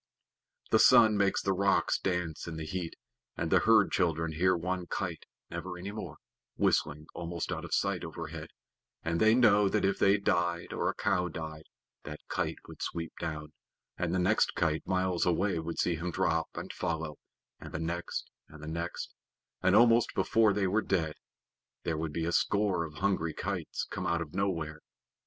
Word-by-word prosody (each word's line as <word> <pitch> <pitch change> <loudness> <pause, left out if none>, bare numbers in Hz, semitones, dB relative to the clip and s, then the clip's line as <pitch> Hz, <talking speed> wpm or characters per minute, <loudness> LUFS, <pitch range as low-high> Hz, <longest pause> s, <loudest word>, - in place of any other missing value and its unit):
The 110 - +5
sun 115 -4 +7
makes 100 -1 +2
the 95 - +2
rocks 100 +1 +2
dance 90 -4 -2
in 85 - -5
the 80 - -4
heat, 85 +1 -4 0.4
and - - -2
the - - +6
herd - - +5
children 80 -2 +1
hear 90 +4 +2
one 90 +1 -3
kite 85 -4 -4 0.2
(never 90 - -5
any 95 +3 -6
more) 90 -8 -7 0.4
whistling 75 +1 +1
almost 85 -1 -4
out - - -3
of - - -8
sight - - 0
overhead, - - -6 0.6
and 85 0 0
they 110 +1 +5
know 105 -5 +5
that 105 -1 +1
if 100 - +1
they 100 +1 +5
died, 85 -3 0
or - - 0
a - - -3
cow 90 0 +1
died, 80 -2 -7 0.4
that 75 0 -7
kite - - -1
would - - -11
sweep 85 -1 -4
down, 75 -1 -5 0.4
and 90 -2 -1
the 95 - +1
next 95 +4 +2
kite 80 -1 0
miles 95 -2 +1
away 90 +1 +1
would 80 +1 -5
see 90 - +2
him 85 +3 -3
drop 80 -1 +1
and - - -6
follow, 80 -3 -3 0.4
and - - -9
the - - -4
next, 85 +1 -3 0.2
and 75 -1 -12
the - - -7
next, 85 +2 -4 0.5
and 95 - +4
almost 115 +1 +5
before 110 -2 +4
they 100 0 +1
were 100 +4 +2
dead 80 -7 0 0.7
there 80 - -1
would 80 -1 -2
be 80 +2 -2
a 85 - 0
score 100 -2 +1
of 75 -1 -10
hungry 95 -4 0
kites - - -3
come - - -3
out 85 0 +1
of 75 - -14
nowhere. 80 -6 -1
85 Hz, 185 wpm, -31 LUFS, 80-100 Hz, 0.7 s, sun